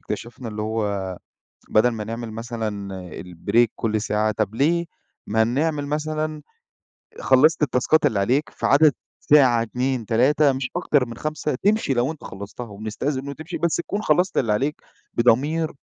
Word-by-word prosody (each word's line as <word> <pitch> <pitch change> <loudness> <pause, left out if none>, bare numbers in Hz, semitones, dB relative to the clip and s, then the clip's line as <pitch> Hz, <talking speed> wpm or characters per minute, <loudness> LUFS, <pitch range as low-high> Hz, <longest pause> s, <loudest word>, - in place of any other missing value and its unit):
إكتشَفنا 120 +1 -6
اللي 105 0 -4
هو 100 -4 -2 0.5
بدل 110 +3 +4
ما 110 -2 -4
نعمل 115 +1 -5
مثلًا 110 -3 -4 0.3
الbreak 100 +7 +1
كل 110 -1 -1
ساعة 110 0 0
طب 110 0 -1
ليه، 170 +6 +2 0.4
ما 110 +2 +3
نعمل 145 +5 0
مثلًا 155 +1 -2 0.8
خلّصت 150 +5 +4
التاسكات 145 +3 +2
اللي 105 - +1
عليك 130 +9 +1
في - - -3
عدد 145 +1 +6 0.3
ساعة، 130 -6 +5
2، 125 0 -2
3، 135 +5 +3
مش 130 -1 -3
أكتر 145 -7 +2
من 115 -1 -8
5 155 0 -3
تمشي 205 - +1
لو 125 +4 +1
أنت 155 - -14
خلّصتها، 100 +5 -8
وبنستأذن 110 +7 -4
منُه 140 - -6
وتمشي 160 +5 -6
بس 170 -3 +1
تكون 200 +4 -3
خلّصت 180 +3 +2
اللي 115 -5 +1
عليك 140 +8 0 0.4
بضمير 145 +7 +2
125 Hz, 155 wpm, -23 LUFS, 110-150 Hz, 0.8 s, عدد